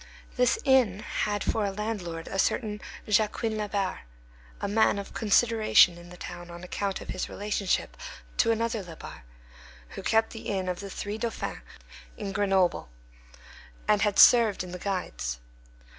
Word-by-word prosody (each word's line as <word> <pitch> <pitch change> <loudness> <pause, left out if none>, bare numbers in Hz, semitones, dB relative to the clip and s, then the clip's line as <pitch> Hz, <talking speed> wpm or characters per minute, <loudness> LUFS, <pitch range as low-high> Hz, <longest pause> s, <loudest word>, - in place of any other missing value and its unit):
This 250 -1 +3
inn 250 -8 +4
had 205 -1 -2
for 220 - 0
a 200 - +1
landlord 195 -6 -4
a 195 - -3
certain 210 +1 0 0.3
Jacquin 215 +1 +1
Labarre, 205 -2 -2 0.6
a - - -2
man 220 0 +3
of 200 - -6
consideration 220 -4 +4
in 175 0 -13
the 180 - -11
town 175 0 -8
on 170 +1 -9
account 195 +2 -3
of - - -10
his 185 - -3
relationship 205 -2 -1 0.4
to 230 - +4
another 230 -1 0
Labarre, 165 - -10 0.7
who - - -7
kept 225 +3 +2
the 225 - -8
inn 190 -2 -1
of 180 -1 -2
the 200 - -7
Three 205 +3 -5
Dauphins 230 -1 -3 0.6
in 200 -2 -4
Grenoble, 190 - +1 1.0
and 210 -1 +3
had 205 -2 +1
served 225 -6 +7
in 180 - -8
the 180 - -6
Guides. 175 - -3
205 Hz, 155 wpm, -28 LUFS, 185-220 Hz, 1.0 s, served